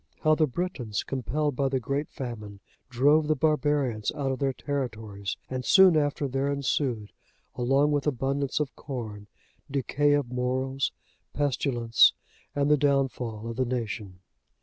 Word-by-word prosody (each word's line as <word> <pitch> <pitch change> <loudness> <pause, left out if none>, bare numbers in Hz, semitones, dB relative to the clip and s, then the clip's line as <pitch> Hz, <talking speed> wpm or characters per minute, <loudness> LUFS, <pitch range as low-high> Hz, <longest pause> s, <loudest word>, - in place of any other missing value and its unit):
How 155 -1 +4
the 155 0 +3
Britons, 130 - -3
compelled 140 +3 -2
by 135 +1 +1
the 135 -1 0
great 140 +5 -2
famine, 105 -6 -7 0.3
drove 145 +5 +3
the 155 - +2
barbarians 145 -6 +1
out 140 -3 -1
of 130 - -3
their 135 -1 +1
territories; 110 -8 -4
and 130 -1 -4
soon 190 +3 +7
after 145 -1 +1
there 135 +2 -1
ensued, 130 -5 -1 0.4
along 135 +4 +2
with 145 0 0
abundance 135 +1 0
of 145 -2 -2
corn, 110 -7 -6 0.4
decay 145 +1 +1
of 145 -4 0
morals, 130 +2 -1 0.4
pestilence, 125 -5 +3 0.4
and 145 +1 +2
the 150 - +6
downfall 130 -6 0
of 115 0 -5
the 130 - +2
nation. 110 -6 -4
135 Hz, 145 wpm, -27 LUFS, 120-145 Hz, 0.4 s, soon